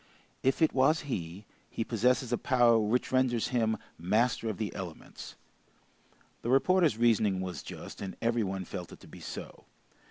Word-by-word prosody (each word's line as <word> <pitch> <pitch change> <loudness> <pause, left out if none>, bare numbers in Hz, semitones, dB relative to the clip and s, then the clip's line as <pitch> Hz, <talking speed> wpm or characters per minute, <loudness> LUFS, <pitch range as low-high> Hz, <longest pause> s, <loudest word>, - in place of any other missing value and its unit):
If 135 +5 +2
it 160 - +3
was 135 +5 +3
he, 95 - -5 0.2
he 115 - -2
possesses 125 +2 +1
a - - +2
power 120 -3 +4
which 110 +4 0
renders 130 -3 +2
him 110 -3 +1 0.2
master 115 +6 +1
of 105 - -4
the 110 -2 -3
elements." 90 -5 -8 1.1
The 120 - -3
reporter's 155 - +3
reasoning 110 -5 +3
was 95 -1 -4
just, - - -9
and 95 -2 -6
every 115 0 +1
one 95 -2 -3
felt 90 -1 -7
it - - -12
to - - -14
be - - -12
so. - - -8
115 Hz, 165 wpm, -30 LUFS, 100-125 Hz, 1.1 s, power